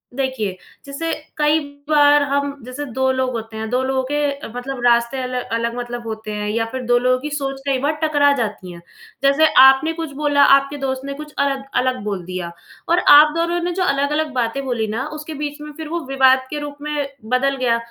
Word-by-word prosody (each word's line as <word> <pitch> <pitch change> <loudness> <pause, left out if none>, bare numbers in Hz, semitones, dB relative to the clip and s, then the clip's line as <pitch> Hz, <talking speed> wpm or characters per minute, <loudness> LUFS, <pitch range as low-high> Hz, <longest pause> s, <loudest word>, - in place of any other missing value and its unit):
देखिए, 255 -8 -2 0.3
जैसे 325 +4 -4 0.3
कई 300 +1 +3 0.3
बार 290 -1 +5
हम 280 0 0
जैसे 255 +4 -6
2 265 0 +1
लोग 260 -1 0
होते 225 -1 -6
हैं, 220 0 -4
2 250 +2 +1
लोगों 260 0 0
के 290 -1 -1
मतलब 250 0 -5
रास्ते 235 +2 +2
अलग 250 0 -3
अलग 230 0 -1
मतलब 240 -1 -5
होते 220 -1 -6
हैं 210 0 -3
या 225 +1 0
फ़िर 260 0 -4
2 245 0 +3
लोगों 255 +1 +2
की 300 +3 -5
सोच 270 -1 -4
कई 265 -2 +1
बार 295 +2 +1
टकरा 290 -2 +3
जाती 205 -5 -4
है। 170 - -10 0.4
जैसे 280 +3 +5
आपने 270 +5 +6
कुछ 325 -3 -5
बोला, 290 -1 +3
आपके 275 +1 +4
दोस्त 265 -1 -3
ने 280 - -4
कुछ 300 +1 -10
अलग 275 -1 0 0.2
अलग 255 0 0
बोल 200 -4 -3
दिया 180 -1 -5 0.4
और 345 +1 +4 0.2
आप 300 +1 +7
दोनों 340 +1 0
ने 350 - -1
जो - - +2
अलग-अलग 295 0 0
बातें 250 +2 -1
बोली 235 -4 -1
ना 230 +6 -3
उसके 305 +1 -7
बीच 295 0 -4
में 300 - -8
फ़िर 315 -1 -6
वो 340 +1 -2
विवाद 265 -1 +4
के 300 - -4
रूप 290 -1 -7
में 295 -1 -2 0.3
बदल 275 +2 +1
गया। 245 -3 +1
270 Hz, 210 wpm, -20 LUFS, 245-295 Hz, 0.4 s, आप